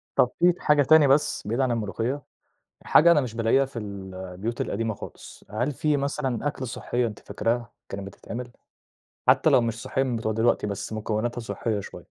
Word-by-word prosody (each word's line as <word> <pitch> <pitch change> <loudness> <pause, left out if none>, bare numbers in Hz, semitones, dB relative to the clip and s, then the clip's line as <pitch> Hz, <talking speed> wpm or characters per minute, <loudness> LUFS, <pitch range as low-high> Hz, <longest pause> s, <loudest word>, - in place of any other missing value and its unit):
طَب 125 - +4
في 180 +1 +6
ت 175 - -9
حاجة 150 -1 +4
تانية 155 0 +6
بس 140 -5 +2
بعيد 115 +5 -1
عن 130 -2 +2
الملوخية؟ 115 +5 -2 0.6
حاجة 170 +2 +6
أنا 150 -3 +5
مش 120 -4 -5
بالاقيها 115 +4 +3
في 130 -3 -7
ال 100 -2 -7
البيوت 95 +5 -4
القديمة 110 +1 -1
خالص، - - -11
هل 120 +7 -1
في 150 +2 +1
مثلًا 140 -2 -1
أكلة 135 -2 -3
صحّية 120 +1 -1
أنتِ 105 - -8
فاكراها 115 +3 -2 0.2
كانت 100 0 -5
بتتعمل، 120 +5 -7 0.8
حتّى - - +5
لو - - +5
مش 115 0 -2
صحّية 130 0 0
من 125 -3 -1
بتوع 110 -1 -1
دلوقتي 110 -1 +2
بس 100 +2 -4
مكوّناتها 110 +3 -2
صحّية 115 -2 -2
شوية؟ - - -8
120 Hz, 190 wpm, -26 LUFS, 110-135 Hz, 0.8 s, في